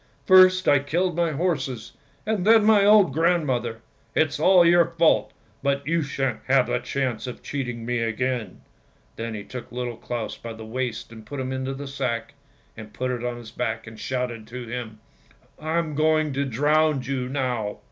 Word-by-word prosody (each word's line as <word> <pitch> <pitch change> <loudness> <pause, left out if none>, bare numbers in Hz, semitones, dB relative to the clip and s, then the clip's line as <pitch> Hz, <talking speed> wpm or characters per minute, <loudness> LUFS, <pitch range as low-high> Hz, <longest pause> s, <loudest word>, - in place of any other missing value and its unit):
First 185 -1 +6
I 145 - +6
killed 170 +5 -1
my 170 -2 +1
horses, 135 -8 -2 0.3
and 215 -3 0
then 220 +1 +6
my 215 -2 +5
old 205 -7 +6
grandmother! 135 -9 0 0.3
It's 155 -1 +1
all 180 +2 +6
your 170 0 +4
fault, 165 -1 +3 0.3
but 140 0 0
you 165 +3 +1
shan't 135 -4 -2
have 135 -1 +4
the - - -1
chance 125 -1 -3
of 125 - -8
cheating 125 -5 -4
me 120 0 -1
again! 115 +1 -2 0.3
" - - -36
Then 115 -1 -4
he 105 - -6
took 125 +3 -9
Little 120 -1 -4
Claus 120 -3 -5
by 115 -1 -7
the 110 0 -9
waist 120 0 -4
and 110 -1 -11
put 140 +6 -7
him 130 0 -3
into 130 +1 -3
the 140 +1 -7
sack, 115 -4 -3 0.6
put 130 0 -2
it 120 -1 -4
on 120 -1 -3
his 120 -2 -10
back, 115 -2 -3
and 110 0 -11
shouted 125 -4 -3
to 125 0 -7
him 115 -2 -6 0.2
— - - -31
" - - -34
I'm 160 0 -1
going 155 0 +2
to 140 +1 -1
drown 150 +2 +2
you 125 -1 -3
now! 125 -6 -2
130 Hz, 190 wpm, -24 LUFS, 120-155 Hz, 0.6 s, First